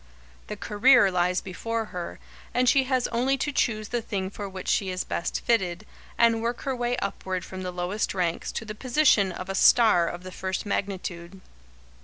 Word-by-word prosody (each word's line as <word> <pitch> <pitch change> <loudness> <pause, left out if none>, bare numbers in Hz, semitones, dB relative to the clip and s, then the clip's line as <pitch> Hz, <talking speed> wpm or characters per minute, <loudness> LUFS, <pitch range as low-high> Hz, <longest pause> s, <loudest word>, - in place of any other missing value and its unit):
The 210 - -6
"career" 215 0 +4
lies 180 0 +1
before 225 +5 -3
her, 175 -1 -5 0.4
and 250 +1 +2
she 270 +1 +4
has 255 -2 +1
only 255 +3 +1
to 295 - -1
choose 215 -6 0
the 240 -1 -1
thing 195 -4 -3
for 200 -1 -6
which 190 -1 -8
she 195 - +1
is 185 0 -2
best - - -3
fitted, 195 -4 0 0.3
and 230 -1 +4
work 235 +1 -2
her 270 -2 -2
way 245 0 -1
upward 185 -2 -3
from 190 0 -7
the 185 - -4
lowest 180 +4 -2
ranks 175 -3 -1
to 225 - -4
the 215 - -6
position 235 -4 +3
of 185 +1 -7
a 195 - -3
star 210 -4 +5
of 175 +1 -6
the 185 - -8
first 190 +2 -3
magnitude. 190 -3 -4
200 Hz, 190 wpm, -26 LUFS, 185-235 Hz, 0.4 s, star